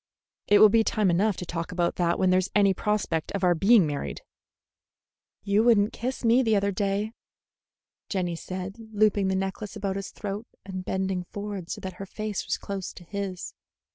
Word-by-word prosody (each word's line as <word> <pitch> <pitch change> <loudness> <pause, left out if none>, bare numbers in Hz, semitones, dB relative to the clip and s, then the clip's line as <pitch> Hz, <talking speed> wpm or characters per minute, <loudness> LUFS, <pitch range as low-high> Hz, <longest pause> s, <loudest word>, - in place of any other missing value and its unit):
"It 205 - +6
will 215 +1 +8
be 225 +2 +4
time 210 -4 +2
enough 200 +4 +2
to 180 - -5
talk 165 -1 -4
about 175 -1 0
that 170 -1 +1
when 185 -1 +3
there's 185 0 +2
any 200 -2 +5
prospect 190 -6 -1
of 200 -1 -2
our 180 -1 +5
being 195 +3 +5
married." 145 -2 -4 1.2
"You 205 +2 +3
would 235 -2 +6
n't 205 +2 +1
kiss 255 0 -4
me 235 +3 +5
the 225 -4 +2
other 200 0 +2
day," 200 +2 -1 1.0
Jenny 180 -3 -1
said, 185 +4 -6 0.2
looping 205 -2 +3
the 190 - +1
necklace 195 +2 -3
about 200 -2 -2
his 195 - -5
throat 205 +2 -6 0.2
and 185 -1 -5
bending 190 -1 -2
forward 200 -2 -6
so - - -4
that 185 -1 -6
her 195 - -6
face 215 +1 -4
was - - 0
close 195 -2 -5
to 175 - -12
his. 195 0 -5
195 Hz, 190 wpm, -27 LUFS, 185-210 Hz, 1.2 s, will